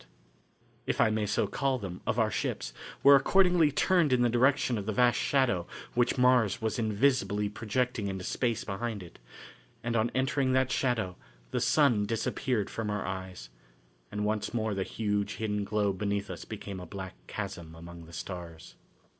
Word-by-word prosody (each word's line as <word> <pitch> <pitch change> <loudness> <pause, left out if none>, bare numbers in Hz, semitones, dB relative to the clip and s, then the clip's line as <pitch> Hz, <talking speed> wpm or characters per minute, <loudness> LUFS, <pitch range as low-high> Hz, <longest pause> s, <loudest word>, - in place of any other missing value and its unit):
The - - -21
prows, - - -31 0.8
if - - +1
I - - +5
may 110 -1 0
so 105 - +1
call 135 +6 0
them, 95 -6 -7
of 125 -1 0
our 110 -2 +2
ships - - -3 0.3
were 140 0 +9
accordingly 175 +1 +4
turned 170 0 +3
in 125 -1 +4
the 120 - +3
direction 130 -1 +3
of 100 - -6
the - - +1
vast 120 +3 +3
shadow 125 -11 +1 0.3
which 120 +2 +2
Mars 125 -3 +4
was 110 +1 -2
invisibly 110 -2 +1
projecting 115 0 -1
into 95 -1 -4
space 115 +2 -1
behind 105 0 -4
it, 85 - -14 0.6
and 115 0 -1
on 115 +1 +2
entering 130 0 +1
that 130 -1 +2
shadow 115 -10 0 0.3
the - - -1
sun 120 -9 +3
disappeared 115 0 -1
from 110 -2 -4
our 105 0 -2
eyes, 95 -8 -6 0.6
and 105 0 -2
once 110 +2 -1
more 110 -2 0
the 95 - -2
huge 105 0 -1
hidden 105 -2 -2
globe 100 -2 0
beneath 100 -1 -1
us - - -7
became 100 -3 -7
a 90 - -8
black 95 0 -7
chasm 80 -1 -6
among 85 0 -10
the 85 - -15
stars. 85 -2 -7
110 Hz, 180 wpm, -30 LUFS, 100-125 Hz, 0.8 s, were